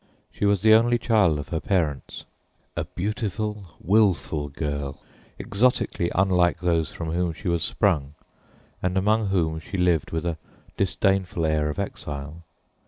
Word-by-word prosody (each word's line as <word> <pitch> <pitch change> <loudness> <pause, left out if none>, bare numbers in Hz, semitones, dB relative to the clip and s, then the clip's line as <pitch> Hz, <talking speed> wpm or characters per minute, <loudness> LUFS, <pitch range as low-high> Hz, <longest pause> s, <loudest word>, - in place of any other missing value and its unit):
She - - -2
was 100 -1 +2
the 110 0 +7
only 120 +2 +5
child 105 -9 +3
of 75 - -6
her 80 - -1
parents, 80 -8 -2 0.5
a - - -2
beautiful, 105 -2 -4
willful 90 -7 +2
girl, 70 -1 -4 0.4
exotically 100 -5 +1
unlike 90 -2 +3
those 85 -3 +1
from 80 -2 -5
whom 85 0 0
she 95 - -8
was 85 -2 +1
sprung 75 -8 0 0.7
and 90 +1 0
among 105 +2 +2
whom 80 -5 0
she 90 +5 -6
lived 90 -4 +2
with 80 +1 -3
a 85 -2 -2 0.4
disdainful 95 -3 +1
air 75 -1 +1
of 75 - -4
exile. 75 +3 -5
90 Hz, 145 wpm, -25 LUFS, 80-100 Hz, 0.7 s, the